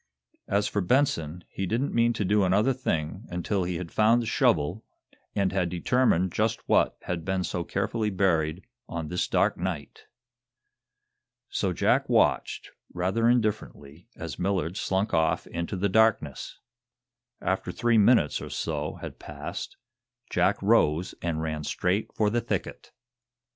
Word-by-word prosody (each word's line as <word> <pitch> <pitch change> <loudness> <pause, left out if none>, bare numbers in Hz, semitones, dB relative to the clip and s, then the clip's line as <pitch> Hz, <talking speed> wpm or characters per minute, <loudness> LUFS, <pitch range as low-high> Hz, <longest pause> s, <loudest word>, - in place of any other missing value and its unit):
As 100 +1 +1
for 105 - -1
Benson, 90 - +1
he 95 - -4
didn't 120 +8 -1
mean 120 0 +3
to 105 - -2
do 105 +2 +3
another 105 +8 +3
thing 95 -5 -3
until 90 +2 -1
he 90 0 -2
had 85 -1 -5
found 110 +2 +4
the 120 - -2
shovel, 90 -1 +1 0.5
and 100 -2 +1
had 90 -2 0
determined 90 0 +2
just 110 +4 -1
what - - +3
had 85 -2 -3
been 95 0 -1
so 90 -1 -2
carefully 105 +4 -1
buried 90 -3 0 0.2
on 80 -2 -4
this 90 - -1
dark - - +2
night! 85 -5 -5 1.4
So - - -1
Jack - - +1
watched, - - +1 0.2
rather 95 +6 +1
indifferently, 105 - -2
as 80 -7 -7
Millard 90 -2 -1
slunk 95 +3 -1
off 80 0 +2
into 85 +3 -4
the 100 +3 +1
darkness. 100 - +1 0.8
After - - -1
three 120 -2 +2
minutes 105 -7 +4
or - - -7
so - - -3
had - - -7
passed, 75 0 -7 0.5
Jack - - +2
rose 80 +5 +3
and 80 -2 -2
ran 75 -1 -3
straight 90 +7 -1
for 105 -1 +2
the 120 +1 +1
thicket. - - -4
95 Hz, 145 wpm, -27 LUFS, 85-110 Hz, 1.4 s, found